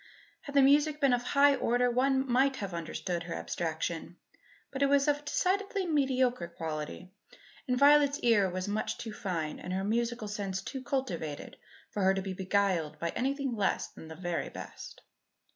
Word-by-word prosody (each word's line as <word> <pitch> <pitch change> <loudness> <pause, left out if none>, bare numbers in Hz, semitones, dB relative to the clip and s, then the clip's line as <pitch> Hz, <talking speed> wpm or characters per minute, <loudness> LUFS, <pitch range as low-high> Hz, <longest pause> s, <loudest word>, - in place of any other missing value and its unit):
Had 285 - -9
the 280 - +7
music 295 +2 +4
been 275 -4 +4
of 245 - +2
a - - -13
high 280 +1 +5
order 245 -2 +2
one 265 +2 +2
might 265 +2 +3
have 200 -6 -5
understood 170 +1 -3
her 170 0 -5
abstraction; 165 +1 -3 0.5
but 270 - -5
it 280 - +5
was 280 0 +3
of 290 0 +2
a - - -16
decidedly 385 +6 0
mediocre 260 - +1
quality, 165 +2 -6 0.6
and 250 -1 +1
Violet's 285 +1 +5
ear 210 -5 +4
was 185 +2 -3
much 210 +1 -2
too 225 -2 -6
fine 165 -7 -3
and 180 - -5
her 190 +1 -1
musical 235 +1 -1
sense 200 -2 -3
too 265 - -5
cultivated 190 - -3 0.4
for 205 - -3
her 190 0 +4
to 195 - -1
be 190 -1 -4
beguiled 185 -5 0
by 170 - -2
anything 270 - -1
less 205 -3 0
than 160 - -12
the 160 - -9
very 175 0 -3
best. - - -9
230 Hz, 180 wpm, -30 LUFS, 180-275 Hz, 0.6 s, the